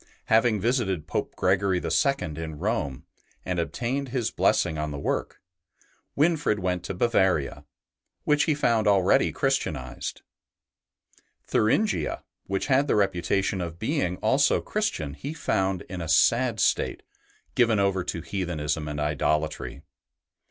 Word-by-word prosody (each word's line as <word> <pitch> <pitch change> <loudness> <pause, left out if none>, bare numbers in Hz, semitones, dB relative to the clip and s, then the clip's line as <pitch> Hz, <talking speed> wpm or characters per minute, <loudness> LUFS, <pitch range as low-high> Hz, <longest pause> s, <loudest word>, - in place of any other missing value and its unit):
Having 110 -1 +4
visited 110 - 0
Pope - - -3
Gregory 95 0 +2
IL 140 - +2 0.3
in 80 -2 -5
Rome 85 - -2 0.4
and 90 -1 -1
obtained 125 +10 -2
his 120 -3 -1
blessing 80 - +1
on 75 0 -2
the 70 - -5
work, 70 - -2 0.8
Winfrid 150 -7 +2
went 90 -2 -1
to - - -4
Bavaria, 95 - +1 0.6
which 150 0 +3
he 155 - +2
found 115 -7 +2
already 100 -3 +4
Christianized. - - -2 1.2
Thuringia, 200 - +1 0.2
which 95 0 -1
had 140 +1 +3
the - - +2
reputation 95 0 +1
of 85 -1 -5
being 110 - -1
also 135 +6 +3
Christian, 210 - -2
he 140 - -6
found 95 - 0
in 90 -2 -7
a 80 - -5
sad 115 +6 +3
state, - - +1 0.5
given 115 -3 +3
over 100 -2 +1
to 85 - -3
heathenism 80 -5 -3
and 75 0 -4
idolatry. 75 -2 -1
95 Hz, 130 wpm, -26 LUFS, 85-120 Hz, 1.2 s, Having